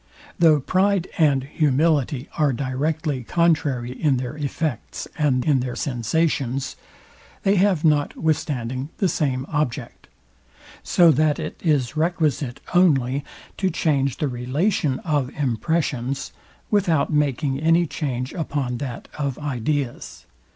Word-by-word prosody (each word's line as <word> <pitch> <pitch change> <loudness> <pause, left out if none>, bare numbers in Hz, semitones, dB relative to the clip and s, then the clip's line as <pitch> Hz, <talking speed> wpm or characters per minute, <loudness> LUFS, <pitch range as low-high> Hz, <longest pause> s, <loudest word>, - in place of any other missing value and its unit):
Though 160 -3 +6
pride 190 +5 +1
and 140 -4 +4
humility 145 -2 +1
are 150 -3 +2
directly 140 +2 -2
contrary 145 -6 +1
in 135 +1 +1
their 125 +3 -4
effects, 140 - -3
and 135 -5 +1
in 145 -4 +3
their 125 -1 -3
sensations, 135 0 -1 0.7
they 195 +1 +3
have 185 -4 +2
notwithstanding 145 -4 0
the 195 - +2
same 135 -5 -1
object; 145 -6 -3 0.7
so 170 -2 +5
that 150 +1 +2
it - - -6
is 150 -5 +1
requisite 155 -5 0
only 140 -7 +3 0.3
to 190 - +1
change 140 -6 0
the 150 - 0
relation 140 - 0
of 145 -6 0
impressions, 135 0 -1 0.4
without 170 -8 +2
making 145 -1 +1
any 165 +3 +3
change 130 -5 -3
upon 140 -7 -2
that 130 -4 -6
of 140 -3 -1
ideas. 140 -2 -3
145 Hz, 115 wpm, -23 LUFS, 130-160 Hz, 0.7 s, Though